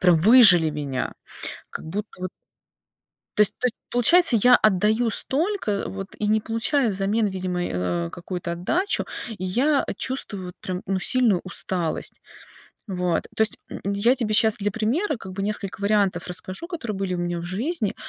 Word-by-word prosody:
прям 180 Hz, -2 st, +5 dB
выжали 190 Hz, -7 st, +7 dB
меня. 140 Hz, -4 st, -4 dB, 0.6 s
Как -, -, -8 dB
будто 205 Hz, +6 st, -4 dB
вот. 185 Hz, -, -3 dB, 1.1 s
То -, -, +6 dB
есть 210 Hz, -, +5 dB
то -, -, -1 dB
есть 245 Hz, -, -5 dB
получается, 330 Hz, +5 st, +5 dB
я 250 Hz, +2 st, +7 dB
отдаю 215 Hz, +3 st, +2 dB
столько, 325 Hz, -, 0 dB
э, 200 Hz, -, -2 dB
вот 195 Hz, 0 st, -6 dB
и 210 Hz, -, 0 dB
не 215 Hz, +1 st, +3 dB
получаю 230 Hz, +4 st, +1 dB
взамен, 200 Hz, +3 st, 0 dB
видимо, 185 Hz, -2 st, -3 dB
э, -, -, -3 dB, 0.3 s
а, 85 Hz, -, -5 dB
какую-то 175 Hz, -1 st, -5 dB
отдачу. 330 Hz, -, -1 dB, 0.3 s
И 185 Hz, -, -6 dB
я, 265 Hz, +10 st, +2 dB
э, -, -, -2 dB
чувствую 210 Hz, -8 st, -3 dB
вот 180 Hz, -, -8 dB
прям, 185 Hz, 0 st, -4 dB
ну, 195 Hz, -1 st, -1 dB
сильную 225 Hz, -2 st, +3 dB
усталость. 180 Hz, -3 st, -3 dB, 0.7 s
Вот, 180 Hz, -4 st, -1 dB
то 220 Hz, -, +3 dB
есть, 220 Hz, -, +3 dB
м, -, -, -7 dB
я 200 Hz, +6 st, +2 dB
тебе 215 Hz, -4 st, -1 dB
щас 220 Hz, 0 st, +4 dB
для 205 Hz, 0 st, -1 dB
примера 250 Hz, -, 0 dB
как 195 Hz, -4 st, -9 dB
бы 195 Hz, +1 st, -4 dB
несколько 200 Hz, -2 st, -3 dB
вариантов 200 Hz, -3 st, +1 dB
расскажу, 185 Hz, -, -5 dB
которые 285 Hz, -, -5 dB
были 190 Hz, -1 st, -2 dB
у -, -, -3 dB
меня 175 Hz, 0 st, -2 dB
в -, -, -6 dB
жизни, 215 Hz, -, -2 dB
205 Hz, 180 wpm, -24 LUFS, 185-235 Hz, 1.1 s, выжали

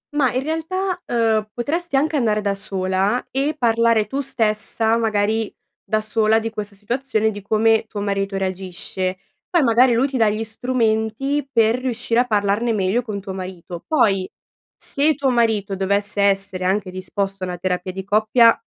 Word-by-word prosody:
Ma, 270 Hz, -4 st, +3 dB
in 255 Hz, +1 st, -1 dB
realtà, 360 Hz, +4 st, -2 dB
uhm, 220 Hz, -3 st, +1 dB
potresti 320 Hz, +6 st, -2 dB
anche 300 Hz, +3 st, +2 dB
andare 220 Hz, -5 st, +1 dB
da 200 Hz, -1 st, 0 dB
sola 195 Hz, +3 st, 0 dB
e 280 Hz, +4 st, 0 dB
parlare 230 Hz, -3 st, +3 dB
tu 270 Hz, +7 st, -3 dB
stessa, 220 Hz, -2 st, 0 dB
magari, 220 Hz, -1 st, 0 dB, 0.3 s
da 215 Hz, 0 st, 0 dB
sola, 215 Hz, 0 st, +2 dB
di 225 Hz, 0 st, -4 dB
questa 210 Hz, -2 st, -6 dB
situazione, 220 Hz, +1 st, -1 dB
di 205 Hz, -1 st, -8 dB
come 220 Hz, +2 st, +2 dB
tuo 210 Hz, -, -6 dB
marito 195 Hz, -1 st, -1 dB
reagisce. 185 Hz, 0 st, -3 dB, 0.3 s
Poi, 345 Hz, -4 st, +3 dB
magari, 240 Hz, +1 st, +5 dB
lui 245 Hz, +4 st, +2 dB
ti 270 Hz, -2 st, -3 dB
dà 220 Hz, -3 st, +4 dB
gli 215 Hz, +2 st, -2 dB
strumenti 230 Hz, +4 st, -1 dB
per 230 Hz, 0 st, +3 dB
riuscire 245 Hz, -2 st, 0 dB
a 250 Hz, -, +2 dB
parlarne 210 Hz, +2 st, +1 dB
meglio 200 Hz, +3 st, +1 dB
con 215 Hz, -4 st, -5 dB
tuo 195 Hz, 0 st, -6 dB
marito; 185 Hz, -2 st, -7 dB
poi, 205 Hz, -11 st, +2 dB, 0.5 s
se 295 Hz, +2 st, +1 dB
tuo 270 Hz, 0 st, +1 dB
marito 220 Hz, -5 st, +1 dB
dovesse 200 Hz, +2 st, 0 dB
essere 195 Hz, -2 st, +1 dB
anche 190 Hz, 0 st, 0 dB
disposto 195 Hz, +1 st, -4 dB
a -, -, -1 dB
una 180 Hz, 0 st, -4 dB
terapia 180 Hz, +1 st, -2 dB
di 190 Hz, +1 st, -6 dB
coppia, 215 Hz, +3 st, +4 dB
220 Hz, 165 wpm, -21 LUFS, 200-245 Hz, 0.5 s, magari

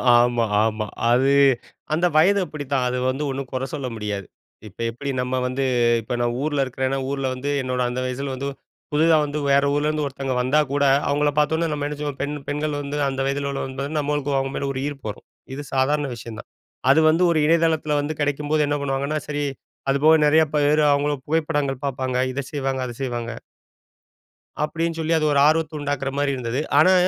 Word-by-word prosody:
ஆமா, 120 Hz, -1 st, +3 dB, 0.2 s
ஆமா. 110 Hz, -1 st, -1 dB, 0.3 s
அது 130 Hz, +3 st, +4 dB, 0.6 s
அந்த 170 Hz, +3 st, +2 dB
வயது 200 Hz, +5 st, +5 dB
அப்பிடித்தான். 140 Hz, -4 st, -2 dB
அது 125 Hz, +1 st, -1 dB
வந்து 135 Hz, +3 st, -2 dB
ஒண்ணும் 135 Hz, -1 st, -5 dB
கொற 130 Hz, +1 st, -1 dB
சொல்ல 140 Hz, -4 st, -3 dB
முடியாது. 105 Hz, -3 st, -4 dB, 0.4 s
இப்ப 95 Hz, -, -17 dB
எப்பிடி 140 Hz, +4 st, -4 dB
நம்ம 125 Hz, +1 st, -2 dB
வந்து 130 Hz, +2 st, -2 dB, 0.4 s
இப்ப 125 Hz, +3 st, -5 dB
நான் 120 Hz, 0 st, 0 dB
ஊர்ல 145 Hz, -3 st, +1 dB
இருக்கிறேன்னா, 130 Hz, +1 st, -2 dB
ஊர்ல 135 Hz, -1 st, -2 dB
வந்து, 130 Hz, +3 st, -4 dB
என்னோட 125 Hz, -1 st, -2 dB
அந்த 125 Hz, +1 st, -3 dB
வயசில 135 Hz, +2 st, -3 dB
வந்து 140 Hz, +2 st, -4 dB, 0.5 s
புதிதா 160 Hz, +2 st, +4 dB
வந்து 145 Hz, +1 st, -3 dB
வேற 140 Hz, +1 st, +4 dB
ஊர்லருந்து 150 Hz, +1 st, 0 dB
ஒருத்தவங்க 135 Hz, -1 st, -3 dB
வந்தா 135 Hz, +5 st, +2 dB
கூட, 145 Hz, 0 st, +2 dB, 0.2 s
அவுங்கள 145 Hz, +1 st, +2 dB
பதோன்னே, 160 Hz, +2 st, +1 dB
நம்ம 145 Hz, -1 st, -2 dB
என்ன 150 Hz, 0 st, -5 dB
செய்வோம்? 145 Hz, -2 st, -4 dB
பெண் 145 Hz, +1 st, -2 dB
பெண்கள் 150 Hz, 0 st, -1 dB
வந்து 145 Hz, +1 st, -4 dB
அந்த 135 Hz, 0 st, -3 dB
வயதில 140 Hz, 0 st, -1 dB
உள்ளவங்கங்கும்போது, 140 Hz, +2 st, -4 dB
நம்மளுக்கு 145 Hz, -1 st, -1 dB
அவுங்க 135 Hz, 0 st, -2 dB
மேல 140 Hz, -, -2 dB
ஒரு 130 Hz, -, -3 dB
ஈர்ப்பு 140 Hz, -6 st, -6 dB
வரும். 105 Hz, -, -9 dB, 0.3 s
இது 145 Hz, -, -6 dB
சாதாரண 145 Hz, +3 st, +2 dB
விஷயம் 115 Hz, -1 st, -8 dB
தான். -, -, -12 dB, 0.4 s
அது 145 Hz, +4 st, +6 dB
வந்து 165 Hz, +3 st, +3 dB
ஒரு 160 Hz, -, +2 dB
இணையதளத்தில 160 Hz, -2 st, +2 dB
வந்து 150 Hz, +2 st, -3 dB
கிடைக்கும்போது 145 Hz, +1 st, 0 dB
என்ன 145 Hz, 0 st, 0 dB
பண்ணுவாங்கன்னா 140 Hz, +2 st, -1 dB
சரி 145 Hz, 0 st, -2 dB, 0.5 s
அது 135 Hz, -, +3 dB
போக 160 Hz, +1 st, +7 dB
நெறைய 160 Hz, +2 st, +5 dB
பேரு 150 Hz, +1 st, +3 dB
அவுங்கள 145 Hz, +1 st, +2 dB
புகைப்படங்கள் 145 Hz, -4 st, -1 dB
பாப்பாங்க. 130 Hz, -1 st, -2 dB
இத 140 Hz, +2 st, -3 dB
செய்வாங்க. 135 Hz, -2 st, -2 dB
அத 120 Hz, -, -6 dB
செய்வாங்க. 120 Hz, -2 st, -3 dB, 1.3 s
அப்பிடின்னு 165 Hz, +1 st, -2 dB
சொல்லி 160 Hz, +1 st, 0 dB
அது 155 Hz, -, +1 dB
ஒரு 140 Hz, -, +3 dB
ஆர்வத்த 155 Hz, 0 st, +1 dB
உண்டாக்குறமாரி 140 Hz, 0 st, -1 dB
இருந்தது. 125 Hz, +1 st, -2 dB, 0.2 s
ஆனா, 185 Hz, +5 st, +6 dB
140 Hz, 180 wpm, -23 LUFS, 130-150 Hz, 1.3 s, போக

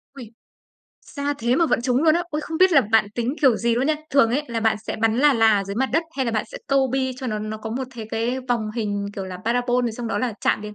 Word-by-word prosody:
Uầy! 240 Hz, -5 st, -10 dB, 0.8 s
Xa 285 Hz, 0 st, -3 dB
thế 235 Hz, +2 st, +1 dB
mà 335 Hz, -, +3 dB
vẫn -, -, +1 dB
trúng 250 Hz, +2 st, +1 dB
luôn 315 Hz, -1 st, +5 dB
á, 345 Hz, -, +1 dB
ôi, 300 Hz, 0 st, -2 dB
không 320 Hz, +1 st, -5 dB
biết 370 Hz, 0 st, +5 dB
là 285 Hz, -, +7 dB
bạn 220 Hz, -2 st, +2 dB
tính 240 Hz, +3 st, -1 dB
kiểu 260 Hz, -6 st, +5 dB
gì 235 Hz, +1 st, +1 dB
luôn 250 Hz, +3 st, 0 dB
nha. 310 Hz, -, +2 dB, 0.2 s
Thường 275 Hz, -5 st, +4 dB
ấy 275 Hz, +5 st, 0 dB
là 230 Hz, -1 st, -2 dB
bạn 220 Hz, -1 st, +2 dB
sẽ -, -, -3 dB
bắn 225 Hz, 0 st, +1 dB
là 290 Hz, +2 st, +5 dB
là 225 Hz, -4 st, +4 dB
ở 195 Hz, -, -2 dB
dưới 200 Hz, +1 st, -5 dB
mặt 265 Hz, +2 st, +1 dB
đất 325 Hz, -, +2 dB
hay 265 Hz, -, 0 dB
là 235 Hz, -, -1 dB
bạn 215 Hz, -, 0 dB
sẽ -, -, -6 dB
câu 275 Hz, -1 st, +2 dB
bi 260 Hz, 0 st, -1 dB
cho 260 Hz, -, -5 dB
nó 215 Hz, -3 st, -2 dB
nó 215 Hz, +1 st, -5 dB
có 220 Hz, +1 st, -7 dB
một 260 Hz, +4 st, -3 dB
thế 225 Hz, -2 st, -6 dB
cái 235 Hz, +3 st, -1 dB
vòng 225 Hz, -3 st, 0 dB
hình, 205 Hz, -3 st, -2 dB
kiểu 195 Hz, -, -4 dB
là, 185 Hz, -1 st, -7 dB
parabol 245 Hz, +1 st, +1 dB
thì 230 Hz, -, -2 dB
xong 235 Hz, +1 st, -6 dB
đó -, -, -1 dB
là 250 Hz, -2 st, -1 dB
chạm -, -, +1 dB
đến 210 Hz, 0 st, -8 dB
240 Hz, 300 wpm, -22 LUFS, 220-270 Hz, 0.8 s, là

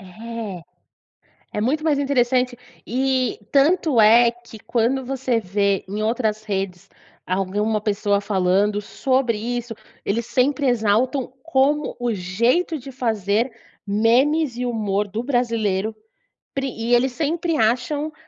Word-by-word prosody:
É. 210 Hz, -1 st, -7 dB, 0.9 s
É 210 Hz, -, -1 dB
muito 300 Hz, +8 st, 0 dB
mais 295 Hz, -3 st, +2 dB
interessante 255 Hz, -2 st, +1 dB, 0.3 s
e 260 Hz, 0 st, 0 dB
tanto 290 Hz, -2 st, +4 dB
é 230 Hz, +2 st, +7 dB
que 235 Hz, -1 st, -14 dB
quando 240 Hz, +4 st, 0 dB
você 255 Hz, -2 st, -1 dB
vê 200 Hz, 0 st, 0 dB
em 205 Hz, +3 st, -4 dB
outras 220 Hz, -2 st, -1 dB
redes 195 Hz, -4 st, -4 dB, 0.4 s
alguma 200 Hz, +4 st, 0 dB
pessoa 205 Hz, -1 st, 0 dB
falando 200 Hz, +1 st, +1 dB
sobre 255 Hz, +2 st, 0 dB
isso, 235 Hz, +1 st, -4 dB, 0.3 s
eles 230 Hz, +3 st, -1 dB
sempre 275 Hz, +4 st, +1 dB
exaltam 245 Hz, +3 st, +1 dB
como 295 Hz, -1 st, +1 dB
o 245 Hz, -1 st, 0 dB
jeito 235 Hz, -, 0 dB
de 270 Hz, +1 st, -10 dB
fazer 225 Hz, -1 st, 0 dB, 0.3 s
memes 245 Hz, +7 st, +2 dB
e 250 Hz, -, -2 dB
humor 210 Hz, -4 st, -1 dB
do 215 Hz, +4 st, -3 dB
brasileiro, 225 Hz, -5 st, 0 dB, 0.6 s
prin 270 Hz, -1 st, -2 dB
e 230 Hz, +2 st, +1 dB
eles 255 Hz, +2 st, +2 dB
sempre 325 Hz, +3 st, -1 dB
acham, 255 Hz, +7 st, 0 dB
235 Hz, 125 wpm, -22 LUFS, 210-265 Hz, 0.9 s, é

